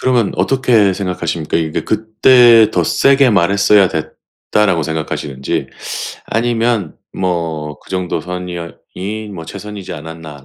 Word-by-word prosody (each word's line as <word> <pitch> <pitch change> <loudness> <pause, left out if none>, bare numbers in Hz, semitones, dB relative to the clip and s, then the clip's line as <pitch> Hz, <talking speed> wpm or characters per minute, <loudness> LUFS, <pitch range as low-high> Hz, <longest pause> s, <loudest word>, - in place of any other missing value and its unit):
그러면 120 -5 +1
어떻게 120 -7 +3
생각하십니까? 85 -5 -2
이게 80 -1 -1
'그때 110 +1 +5
더 90 - +1
세게 135 - +3
말했어야 100 +1 +4
됐다.'라고 90 +3 -2
생각하시는지, 75 -4 -3 0.6
아니면 115 -4 0 0.2
뭐 80 -5 -2
'그 - - -20
정도 90 -2 -2
선이었 90 -1 -6 0.2
이 105 +3 -5
뭐 90 -5 -8
최선이지 100 +1 -8
않았나.' 80 -2 -9
95 Hz, 300 characters per minute, -16 LUFS, 80-110 Hz, 0.6 s, 그때